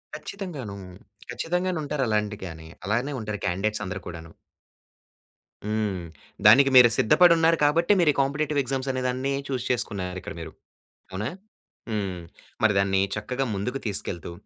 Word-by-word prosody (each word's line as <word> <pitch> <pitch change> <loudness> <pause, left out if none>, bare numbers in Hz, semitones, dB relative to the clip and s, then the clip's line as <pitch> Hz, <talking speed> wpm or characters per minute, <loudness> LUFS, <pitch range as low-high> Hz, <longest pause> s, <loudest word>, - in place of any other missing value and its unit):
ఖచ్చితంగాను. 150 - -6 0.5
ఖచ్చితంగానుంటారు 165 -5 -1
అలాంటి 105 -1 0
గాని, 80 -2 -9 0.2
అలానే 120 +8 0
ఉంటారు 110 -2 -4
కాంన్డిడేట్స్ 100 +5 -1
అందరూ 95 +1 -4
కూడాను. 80 -2 -9 1.3
హ్మ్. 105 -3 -1 0.4
దానికి 135 +6 +8
మీరు 125 -2 +9
సిద్ధపడున్నారు 165 +5 +5
కాబట్టే 170 +6 +3
మీరు 170 -3 +4
ఈ - - -17
కాంపిటీటివ్ 145 +2 0
ఎగ్జామ్స్ 135 +1 -3
అనే 130 0 -2
దాన్ని 130 +2 -1
చూజ్ 130 -3 -3
చేసుకున్నారిక్కడ 100 -4 -3
మీరు. 80 -1 -7 0.6
అవునా? 105 +5 -3 0.6
హ్మ్. 100 -5 -2 0.4
మరి 110 -1 +4
దాన్ని 95 -1 +2
చక్కగా 125 +5 -2
ముందుకు 125 +7 -3
తీసుకెళ్తూ 90 -4 -4
110 Hz, 125 wpm, -25 LUFS, 100-140 Hz, 1.3 s, మీరు